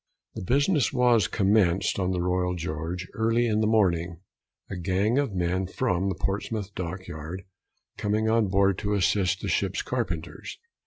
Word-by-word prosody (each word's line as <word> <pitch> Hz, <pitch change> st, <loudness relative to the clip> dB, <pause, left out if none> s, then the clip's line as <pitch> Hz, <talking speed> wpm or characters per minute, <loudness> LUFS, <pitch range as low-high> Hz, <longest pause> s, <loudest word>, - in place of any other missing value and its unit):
The -, -, -6 dB
business 140 Hz, -, +2 dB
was 125 Hz, -4 st, +3 dB
commenced 95 Hz, -3 st, +2 dB
on 90 Hz, -1 st, 0 dB
the 90 Hz, -2 st, -1 dB
Royal 90 Hz, 0 st, 0 dB
George 85 Hz, +2 st, -4 dB
early 115 Hz, +2 st, +1 dB
in 110 Hz, -2 st, +1 dB
the 110 Hz, -, +2 dB
morning, 90 Hz, -6 st, +1 dB, 0.5 s
a 100 Hz, -, -6 dB
gang 95 Hz, +7 st, +1 dB
of 135 Hz, -9 st, -1 dB
men 90 Hz, +1 st, 0 dB
from 95 Hz, -3 st, 0 dB
the 95 Hz, -, -2 dB
Portsmouth 100 Hz, +2 st, -3 dB
Dock 90 Hz, 0 st, -5 dB
yard 80 Hz, +5 st, -7 dB, 0.6 s
coming 105 Hz, +1 st, 0 dB
on 110 Hz, -1 st, +3 dB
board 95 Hz, 0 st, +2 dB
to 105 Hz, -1 st, -1 dB
assist 95 Hz, 0 st, +1 dB
the -, -, -4 dB
ship's -, -, 0 dB
carpenters. -, -, -4 dB
95 Hz, 160 wpm, -26 LUFS, 90-110 Hz, 0.6 s, was